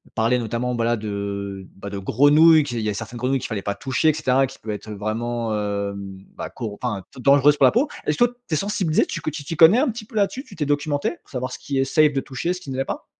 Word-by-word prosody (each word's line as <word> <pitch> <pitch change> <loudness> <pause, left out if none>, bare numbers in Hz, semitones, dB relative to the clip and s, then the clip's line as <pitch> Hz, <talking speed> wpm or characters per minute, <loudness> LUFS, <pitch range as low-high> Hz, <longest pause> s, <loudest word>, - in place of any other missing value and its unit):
parler, 115 +3 +2
notamment, 120 +2 -2
bah, 115 -1 0
la 120 0 +2
de, 100 -2 -5
bah, 100 +1 -8
de 100 - -5
grenouilles, 150 +10 +5
qu'il 120 -4 -4
y 110 - -2
a - - -1
certaines 115 +3 -6
grenouilles 130 +3 0
qu'il - - -5
fallait 110 -3 -3
pas 100 +1 -3
toucher 135 +7 +1
et - - +3
cetera, 135 -3 +2
qui 130 - -12
peut 110 - -5
être, 105 +1 -7
vraiment, 115 +3 -3
mmh, 100 -2 -3 0.2
bah, - - -5
co 110 -5 -6
enfin, 105 -6 -2
dan 130 - -10
dangereuse 145 +1 +4
pour - - +5
la - - +6
peau. 255 +8 +1 0.2
Est-ce 150 - 0
que - - +4 0.2
tu - - -4
es - - +4
sensibilisé, 185 -2 +1
tu - - -5
que - - -3
tu 150 -1 -7
t'y 155 +3 -5
connais 170 +8 +7
un 280 - +2
petit 225 -1 -6
peu, 220 - -16
là-dessus? 210 +6 0
Tu - - -13
t'es 150 - -2
documenté 145 0 0
pour - - -28
savoir 130 -1 -4
ce - - -7
qui 140 -3 -3
est 135 - +3
safe 150 +2 +3
de 135 - 0
toucher, 135 +7 -3
ce 180 - -8
qui 145 - -10
ne 130 - -4
l'est 135 - 0
pas? - - -5
130 Hz, 280 wpm, -22 LUFS, 110-155 Hz, 0.2 s, connais